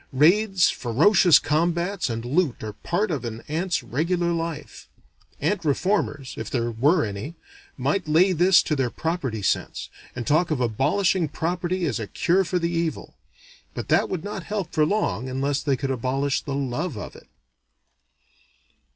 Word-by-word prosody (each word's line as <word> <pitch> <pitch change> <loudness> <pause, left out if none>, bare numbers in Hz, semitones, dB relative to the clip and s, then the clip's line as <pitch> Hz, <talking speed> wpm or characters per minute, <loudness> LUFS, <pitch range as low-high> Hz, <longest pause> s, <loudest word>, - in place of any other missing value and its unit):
Raids, 180 +7 +4
ferocious 165 - +4
combats, 170 +4 0
and 115 0 -4
loot 145 -1 0
are 105 -1 -5
part 180 - -1
of 145 -5 -2
an 115 -1 -6
ant's 165 0 -1
regular 170 +8 0
life. 165 -2 -5 0.5
Ant 175 +5 0
reformers, 145 -3 0
if 110 - -5
there 120 -2 -1
were 145 +9 +2
any, 105 +10 -6 0.4
might 195 -5 -1
lay 170 +5 +4
this 180 +1 +5
to 155 - -1
their 135 -3 0
property 135 - -3
sense, - - -1 0.3
and 120 -2 -4
talk 155 +6 +2
of 155 -4 -1
abolishing 155 - +1
property 175 +4 -2
as 130 -7 -1
a 110 - -4
cure 185 - +2
for 180 0 -1
the 170 -1 -1
evil. 165 -3 -3 0.6
But - - -5
that - - +3
would 180 -4 -3
not 205 -1 -5
help 205 -4 -3
for 155 -1 +3
long 130 - -1
unless 135 +2 -1
they 140 -3 0
could 135 0 -2
abolish 135 +3 -1
the 140 - -4
love 140 +2 -2
of 105 - -7
it. - - -15
155 Hz, 160 wpm, -24 LUFS, 130-180 Hz, 0.6 s, this